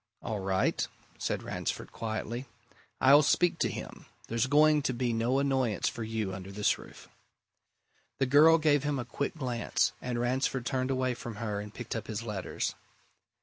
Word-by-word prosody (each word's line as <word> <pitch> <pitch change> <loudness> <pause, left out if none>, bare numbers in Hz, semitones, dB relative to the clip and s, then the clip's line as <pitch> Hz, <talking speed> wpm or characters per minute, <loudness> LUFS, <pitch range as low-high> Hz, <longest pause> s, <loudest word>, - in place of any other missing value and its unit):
"All 110 -3 -3
right," 95 0 +1 0.3
said - - -2
Ransford - - -4
quietly. 115 +3 -4 0.5
"I'll 140 +3 +7
speak 170 +4 +2
to - - +2
him. - - -8 0.2
There's 115 +2 0
going 150 +2 +5
to 130 -3 -1
be 120 -1 0
no 115 +4 +1
annoyance 130 -6 +1
for 115 - -3
you 110 -3 -2
under 95 +1 -7
this 105 +1 +1
roof." - - -13 1.1
The 135 - +2
girl 150 +5 +7
gave 150 -3 +3
him 145 -1 0
a 125 - -3
quick 140 +6 -3
glance, 125 -5 0
and 125 -1 -2
Ransford 130 +1 0
turned 130 -1 -1
away 130 -1 +1
from 120 -2 -7
her 105 -1 -3
and 105 0 -8
picked 120 +2 -6
up 110 - -4
his 110 0 -4
letters. 105 -5 -3
120 Hz, 170 wpm, -30 LUFS, 110-135 Hz, 1.1 s, I'll